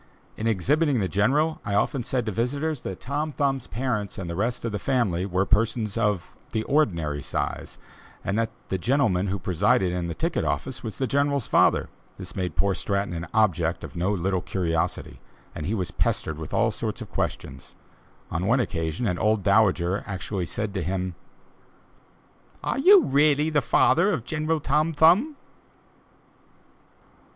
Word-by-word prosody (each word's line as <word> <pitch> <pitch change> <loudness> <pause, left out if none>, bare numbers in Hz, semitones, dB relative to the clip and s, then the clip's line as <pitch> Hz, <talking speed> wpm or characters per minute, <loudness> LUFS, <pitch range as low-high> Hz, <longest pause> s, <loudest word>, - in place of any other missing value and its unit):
In 110 - -3
exhibiting 135 - +2
the 95 - 0
General, 145 - +1
I 100 - -2
often 130 +5 +1
said 125 0 -1
to 110 - -2
visitors, 140 +7 -1
that 95 - -6
Tom 150 +3 -2
Thumb's 135 -2 -1
parents 110 -5 -2
and 95 - -5
the 85 - -4
rest 115 +5 -1
of 115 - -1
the 105 - -3
family 100 -8 0
were 95 0 +1
persons 110 0 +1
of 105 -6 -1 0.2
the 110 - 0
ordinary 85 - 0
size, - - -4 0.5
and 100 - -1
that 115 -1 0 0.2
the 95 - -1
gentleman 110 -5 +1
who 100 +1 -1
presided 90 +1 +1
in 90 -1 -2
the 85 - -4
ticket 165 +1 -1
office 130 -2 -2
was 110 -3 -6
the 135 - 0
General's 140 0 +1
father. - - +3 0.3
This - - -8
made 90 -5 -3
poor 100 -1 +2
Stratton 100 -1 -2
an 85 0 -5
object 90 -7 +1
of - - -8
no 90 +4 0
little 95 -1 0
curiosity, 85 -2 -2 0.3
and 75 - -5
he 110 - 0
was 95 -4 -2
pestered 80 0 -1
with 80 - -7
all - - +2
sorts - - -4
of - - -15
questions; - - -4 0.6
on 90 +3 -1
one 125 +4 +3
occasion 80 -2 -2
an 90 -5 -1
old 110 -2 +2
dowager 100 -2 +2 0.4
said 105 +4 -3
to 95 - -2
him: 90 +1 -2 1.5
"Are - - -1
you 375 +5 +7
really 150 +2 +3
the 150 -2 +3
father 170 +8 +3
of 140 - -1
General 160 0 -1
Tom 150 +3 +1
Thumb?" 180 - +4
110 Hz, 165 wpm, -25 LUFS, 90-140 Hz, 1.5 s, you